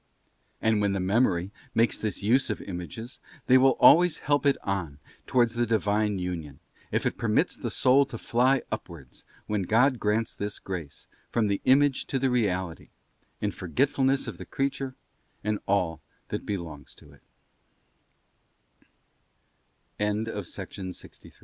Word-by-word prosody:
And 110 -2 +3
when 100 -1 +1
the 100 - -1
Memory 95 -2 +1 0.2
makes 115 +1 +2
this 105 -2 -3
use 125 +6 +3
of - - -2
images 100 +7 -7 0.3
they 130 - +5
will 135 +1 +4
always 175 0 +7
help 145 0 +1
it 140 - +4
on 90 -8 -3 0.3
towards 120 -2 +3
the 120 0 0
Divine 105 -2 +1
union, 85 -6 -5 0.3
if - - 0
it - - -1
permits - - +1
the - - -4
soul 135 +2 +4
to 120 - -7
fly 125 +4 +2
upwards, 85 - -8 0.2
when 105 -1 -1
God 120 +7 +3
grants 110 +2 0
this 100 0 -4
grace, 85 -7 -7 0.2
from 115 -2 +1
the 100 -1 0
image 135 +1 +4
to 135 - -1
the 130 0 +1
reality, 95 -8 -1 0.5
in 105 - 0
forgetfulness 135 - +1
of - - -6
the - - -7
creature 135 -1 -2 0.5
and 105 0 -1
all 90 -6 0 0.3
that - - -3
110 Hz, 130 wpm, -27 LUFS, 95-130 Hz, 0.5 s, always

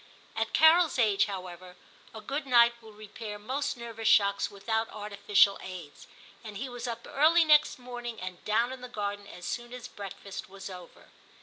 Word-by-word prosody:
At 225 0 -1
Carol's 320 -1 +5
age, 215 -5 +3
however, 185 -2 -8 0.4
a 220 - -9
good 280 +3 -4
night 235 -2 +6
will 220 -1 -13
repair 210 0 -8
most 260 +7 -3
nervous 230 -2 -5
shocks 200 -1 +4
without 220 +3 -2
artificial 205 -1 +2
aids, 180 -6 -9 0.4
and 215 -3 -8
he 265 +6 -4
was 245 0 -6
up 235 0 -5
early 325 +4 +4
next 300 0 +5
morning, 245 -2 -7
and 185 -1 -7
down 230 +4 +1
in 260 -1 -8
the 250 - -8
garden 205 -3 -4
as 180 - -10
soon 240 0 -4
as 250 -1 -7
breakfast 200 -3 -8
was 195 0 -9
over. 180 -1 -12
220 Hz, 175 wpm, -29 LUFS, 200-245 Hz, 0.4 s, night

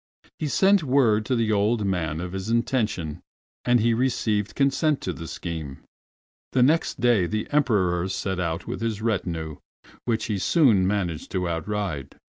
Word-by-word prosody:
He 155 - -1
sent 195 +6 +4
word 120 -6 +3
to 130 - +1
the 115 -2 +1
old 105 +1 +1
man 85 -4 -1
of 90 0 -5
his 95 +2 -4
intention, 110 - -1 0.4
and 120 0 +3
he 115 +1 +3
received 110 -4 0
consent 140 +2 +2
to 90 - -3
the 85 -1 -8
scheme. 80 -7 -6 0.7
The 125 - +4
next 155 +6 +2
day 120 -7 +3
the 110 +3 -2
Emperor 95 -11 +2
set 95 -1 -2
out 85 -1 -2
with - - -5
his 115 -3 -2
retinue, 85 -8 -2 0.5
which 115 -2 0
he 105 -3 -2
soon 110 - +4
managed 90 -6 -2
to 90 -2 0
outride. 85 -4 -3
105 Hz, 160 wpm, -25 LUFS, 90-120 Hz, 0.7 s, sent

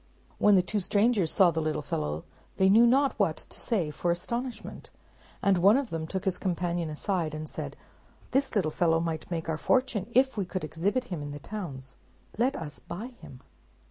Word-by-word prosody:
When 210 -1 +6
the 185 - +5
two 210 +3 -1
strangers 205 -2 +2
saw 185 -3 +5
the 160 0 -1
little 155 -1 -1
fellow, 75 - -3 0.3
they 190 0 +5
knew 230 +3 +7
not 270 +3 +4
what - - +2
to - - -10
say 185 -10 0
for 175 +4 -2
astonishment; 235 +9 -3 0.5
and 195 -2 +4
one 200 +7 +6
of 275 -4 -2
them 160 -1 -3
took 190 +2 -4
his 190 -2 0
companion 175 -2 -1
aside, 160 0 -2
and 155 0 -5
said, - - -6 0.5
"This 270 -2 +1
little 175 -7 +2
fellow 165 0 +2
might 165 -1 -3
make 165 -2 -3
our 160 -1 -2
fortune 250 -5 +1
if 265 -1 +3
we 200 - 0
could 185 0 -4
exhibit 190 +11 -1
him 160 - -3
in 145 - -5
the 145 0 -6
towns. 140 -9 -7 0.4
Let 255 +3 +2
us 150 -4 -6
buy 210 +9 -7
him." 130 - -12
180 Hz, 195 wpm, -28 LUFS, 160-215 Hz, 0.5 s, knew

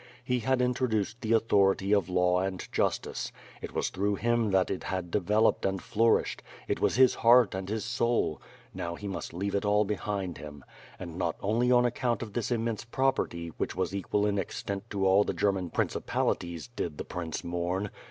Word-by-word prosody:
He 125 0 0
had 125 +2 +1
introduced 120 -3 0
the 115 -1 +1
authority 100 -3 +3
of 100 -2 +2
law 90 0 +3
and 95 0 -3
justice; - - -1 0.3
it - - -6
was - - 0
through 100 +2 0
him 120 +1 +1
that 95 -1 +2
it 95 - -4
had 95 -2 -3
developed 105 +3 +2
and 95 0 0
flourished; 115 +4 +1 0.3
it - - -1
was - - +2
his 130 0 +6
heart 120 -2 +5
and 95 0 -4
his 110 0 -2
soul 115 -8 0 0.2
— - - -27
now 85 0 -4
he 105 - -7
must 95 - -5
leave 100 +4 -3
it 100 - 0
all 105 0 +3
behind 100 -3 -3
him. 75 -2 -10 0.3
And 85 -1 -7
not 85 -3 0
only 115 +5 +1
on 125 0 +5
account 120 -1 0
of 105 -3 -9
this 120 -1 -2
immense 115 -3 -1
property, 120 -9 -1
which - - -2
was 95 0 -1
equal 100 +1 0
in 100 -1 +1
extent 100 +2 -4
to 100 -2 -1
all 95 +2 +5
the - - -3
German 95 -3 0
principalities, 85 -2 -1
did 75 - -3
the - - -5
prince 85 -3 -5
mourn! 90 +3 -2
100 Hz, 190 wpm, -29 LUFS, 95-115 Hz, 0.3 s, his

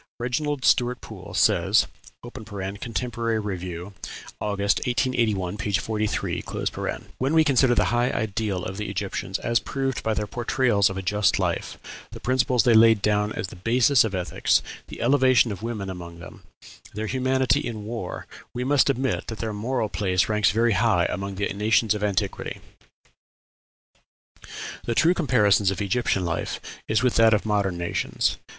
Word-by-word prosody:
Reginald 135 +3 -2
Stuart 125 0 +3
Poole - - -10
says - - +4 0.4
(Contemporary 115 +1 -4
Review, 90 -2 -5 0.5
August, 100 -1 0
1881, 115 -7 0
p. 105 - -3
43): 110 +1 -1 0.8
"When 135 +5 +1
we 160 - +6
consider 130 -4 +3
the - - +3
high 120 +1 +2
ideal 105 -5 -2
of 95 +1 -5
the 105 -2 -4
Egyptians, 100 -1 -3
as 115 0 +1
proved 135 -1 -3
by 110 -1 -1
their 105 - -1
portrayals 120 -2 +1
of 95 - -5
a 95 - -4
just 105 +2 +2
life, - - -2 0.4
the - - -8
principles 130 -2 +2
they 120 - +4
laid 110 -2 +6
down 105 0 +1
as 105 -5 -4
the - - -11
basis 120 +6 +3
of 105 -4 -2
ethics, 90 -1 +1 0.2
the - - -9
elevation 130 -2 +4
of 100 -1 -6
women 110 -4 -4
among 85 -2 -8
them, 85 - -12 0.5
their 110 +1 -3
humanity 130 +2 +1
in 110 -3 -5
war, 110 -5 -5 0.3
we 125 - -2
must 140 +2 +3
admit 135 -1 -1
that 110 - -5
their 110 -1 -3
moral 115 +2 -1
place 95 -3 0
ranks 105 -2 +2
very 115 +3 +2
high 100 -4 +2
among 100 0 -4
the 100 +1 -1
nations 110 +1 +2
of 105 -1 -4
antiquity. 100 -1 -2 2.2
"The 115 - -2
true 170 +8 +4
comparison 105 - +3
of 95 - -4
Egyptian 100 -2 0
life 85 -1 -3 0.3
is 110 +3 +1
with 125 - +2
that 115 -1 +6
of 105 - -2
modern 100 -4 0
nations. 85 0 -1
110 Hz, 155 wpm, -24 LUFS, 100-120 Hz, 2.2 s, we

